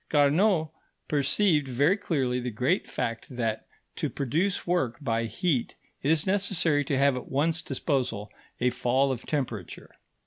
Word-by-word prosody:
Carnot 155 +3 +3 0.4
perceived 150 +2 +2
very 140 +8 +3
clearly 130 - -1
the 125 0 -3
great 125 - 0
fact 115 -2 -3
that, 115 -3 -3 0.3
to - - -1
produce 160 +9 -1
work 170 -10 0
by 115 -5 -1
heat, 145 - -1 0.3
it 140 - 0
is 160 -1 +3
necessary 190 -6 +2
to 135 - 0
have 140 0 +4
at 125 - -6
one's 160 +4 +1
disposal 130 - -2 0.3
a 125 +1 +2
fall 125 +2 +1
of 125 -2 -5
temperature. 120 - -4
140 Hz, 145 wpm, -27 LUFS, 125-165 Hz, 0.4 s, have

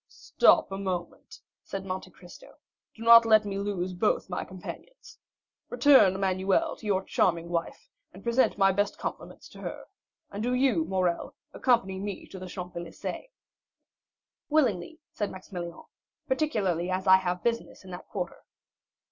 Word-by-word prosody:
"Stop - - +3
a 195 - -4
moment," 185 -3 -5 0.2
said 195 -1 -6
Monte 185 0 -5
Cristo; 175 0 -15 0.4
"do 225 - -9
not 230 0 +9
let 220 -2 +5
me 200 -1 -3
lose 190 -3 -2
both 190 0 0
my 180 - -2
companions. 345 - -11 0.5
Return, 245 -6 +6
Emmanuel, 190 - +1
to 215 - -9
your 190 -2 +1
charming 170 -3 0
wife, 170 -1 -3 0.2
and 190 - -14
present 235 +2 +2
my 195 -1 +5
best 205 +1 -1
compliments - - -7
to - - -13
her; - - -6 0.5
and 200 - -5
do 245 +2 0
you, 250 -11 +2
Morrel, 180 -1 -1 0.2
accompany 195 -7 +1
me 200 -1 -5
to 190 - -9
the 185 - -7
Champs 180 0 -7
Élysées." 170 - -6 1.2
"Willingly," 265 - +1
said 205 - -3
Maximilian; 180 -2 -8 0.4
"particularly 200 - 0
as 185 0 -2
I 190 -1 +8
have 180 -1 -3
business 230 -3 -2
in 185 - -10
that 180 - -9
quarter." - - -5
190 Hz, 150 wpm, -28 LUFS, 180-225 Hz, 1.2 s, not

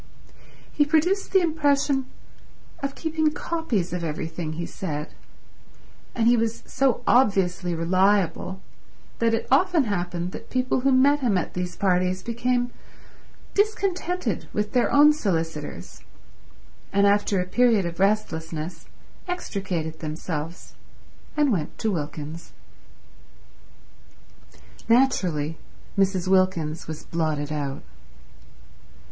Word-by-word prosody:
He 295 - +4
produced 325 +6 +1
the 385 - +5
impression 285 -4 +1 0.7
of 275 0 -3
keeping 315 -1 0
copies 295 - -2
of 180 -1 -3
everything 160 0 -4
he 170 +2 -4
said; 150 -5 -5 1.0
and 230 - +1
he 240 - +6
was 230 -1 -1
so 265 -2 +1
obviously 190 -7 +2
reliable 185 +1 +1 0.6
that 230 0 +3
it 225 - -4
often 340 +2 +4
happened 180 -4 -2
that - - -9
people 255 0 0
who 270 +2 +2
met 275 +3 +5
him 235 -8 +2
at 180 - -3
these 180 0 -3
parties 185 -1 +1
became 245 +1 0 0.8
discontented 365 - 0
with 210 0 -1
their 250 -2 +2
own 295 +1 +7
solicitors, 160 - -3 0.9
and 200 0 +3
after 200 -1 +3
a 180 - 0
period 225 0 +3
of 170 0 -5
restlessness 170 -5 -1 0.4
extricated 185 - -3
themselves 160 +1 -5 0.6
and 295 -3 +3
went 165 -8 -2
to 220 - 0
Wilkins. 155 -1 -5 2.4
Naturally 180 - +2 0.4
Mrs. 190 -2 +1
Wilkins 185 -5 +1
was 155 -1 -6
blotted 155 -3 -1
out. 140 -2 -3
195 Hz, 110 wpm, -25 LUFS, 165-260 Hz, 2.4 s, own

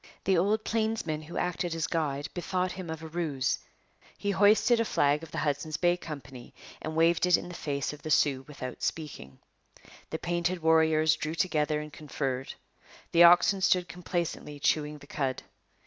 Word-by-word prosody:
The 190 - +3
old 205 +5 +2
plainsman 220 -9 -1
who 155 +3 -8
acted 175 -1 -1
as 165 - -1
guide 145 -3 -1
bethought 180 +1 -1
him 185 -3 -7
of 160 0 -6
a - - -6
ruse: 155 -6 -1 0.6
he 205 - -1
hoisted 210 +4 +4
a - - +3
flag 145 -8 +2
of 165 - -10
the - - -7
Hudson's 150 +1 -1
Bay 175 0 +3
Company 135 -7 -9 0.3
and 155 0 -5
waved 165 +2 +3
it 180 - +6
in - - -7
the - - -8
face 140 -4 -3
of 150 - -11
the 155 - -6
Sioux 135 -2 +3
without 130 -4 -7
speaking. 145 - -4 0.7
The 160 - -3
painted 175 +1 -2
warriors 160 -1 +4
drew 155 +1 -4
together 155 -3 +1
and 150 -1 -8
conferred. 135 -3 -4 0.6
The 170 +1 +8
oxen 175 +3 +6
stood 180 -1 +3
complacently 170 -4 -4
chewing 150 +1 +1
the 145 - -14
cud. 135 -3 -3
160 Hz, 175 wpm, -29 LUFS, 150-175 Hz, 0.7 s, The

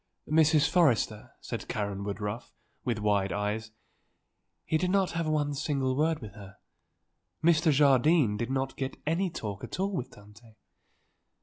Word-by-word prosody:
"Mrs. 155 -1 +4
Forrester," 135 -10 +2
said - - -6
Karen 100 -2 -3
Woodruff, 105 +3 -5 0.3
with 120 -3 -1
wide 105 -2 +1
eyes, 105 +2 -2 1.0
"he 160 - +1
did 180 +2 0
not 195 -1 +2
have 165 -1 -2
one 150 -2 0
single 135 -2 -1
word 155 -1 0
with 105 -2 -9
her; 100 -2 -12 0.9
Mr. 165 -1 +4
Jardine 140 -3 +4
did 115 +3 -3
not 135 0 -2
get 135 -1 -4
any 170 +5 +1
talk 105 - -6
at - - -6
all 195 +1 0
with 130 - -3
Tante. 105 +2 -17
135 Hz, 145 wpm, -29 LUFS, 105-155 Hz, 1.0 s, Mrs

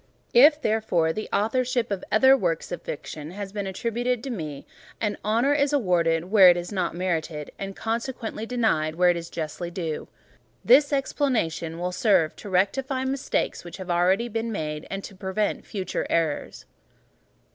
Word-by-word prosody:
If, 295 +5 +7
therefore, 215 - +1
the 215 - -5
authorship 245 +2 0
of 195 -2 -2
other 265 +6 +6
works 170 -10 -1
of 175 - -4
fiction 150 0 -7
has 195 +2 -6
been 205 -2 -3
attributed 235 +4 -2
to 270 - -4
me, 155 - -6 0.3
an 210 -2 -1
honour 230 +7 +2
is 290 0 +1
awarded 175 - +1
where 195 -4 +9
it 175 - +4
is 175 +2 -5
not 185 -4 -1
merited; 165 -4 -2
and 195 0 -5
consequently, 225 -1 -4
denied 215 -11 0
where 180 +1 +5
it - - -1
is 170 0 -6
justly 165 +2 -5
due. 165 -3 -4 0.6
This 285 +5 +6
explanation 235 - -1
will 180 +1 -2
serve 180 -5 +2
to 205 - -9
rectify 260 +8 0
mistakes 270 0 -1
which 175 - -9
may 180 -2 -2
already 180 +5 +3
have 240 -3 -7
been 225 0 -2
made, 150 -5 -4
and 195 0 -4
to - - -9
prevent 190 +2 -2
future 190 -3 -3
errors. 160 -3 -1
195 Hz, 170 wpm, -25 LUFS, 170-235 Hz, 0.6 s, where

